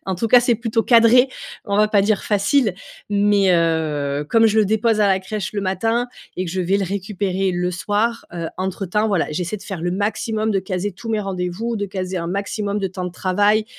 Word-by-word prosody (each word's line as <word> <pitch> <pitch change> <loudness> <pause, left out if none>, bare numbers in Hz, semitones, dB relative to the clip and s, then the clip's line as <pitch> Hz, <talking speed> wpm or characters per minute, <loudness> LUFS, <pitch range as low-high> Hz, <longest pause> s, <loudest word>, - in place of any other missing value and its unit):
en 190 - -1
tout 225 +6 -2
cas, 245 +2 +7
c'est 240 -1 +2
plutôt 225 0 -1
cadré, 235 +2 +5 0.4
on 200 -1 -1
va 215 +1 +4
pas 205 -2 +3
dire 205 0 +1
facile. 205 +1 +2 0.4
Mais, 205 -2 +3
heu, 150 -4 0
comme 225 +4 +4
je 220 0 +2
le 215 - +5
dépose 220 +2 +1
à 205 - +4
la 190 -1 +3
crèche 195 +1 -5
le 205 - -2
matin 225 +6 0 0.3
et 185 - -1
que 175 - -5
je 185 +2 -2
vais 185 +2 +1
le 200 - 0
récupérer 195 0 -2
le 180 0 -1
soir, 210 +6 -1
heu, 170 -2 -4
entre-temps 190 +3 -1
voilà, 195 -5 +1
j'essaie 180 +6 -3
de - - -12
faire 190 -5 -6
le 175 - 0
maximum, 215 +3 -1
de 200 - +1
caser 190 +1 -3
tous 225 +5 -10
mes 220 -1 0
rendez-vous, 195 +4 -3
de 205 -1 -2
caser 185 -1 -4
un 170 - -4
maximum 200 +2 -2
de 195 - -1
temps 185 0 -6
de 180 - -5
travail, 205 +4 +2
200 Hz, 220 wpm, -20 LUFS, 185-215 Hz, 0.4 s, cas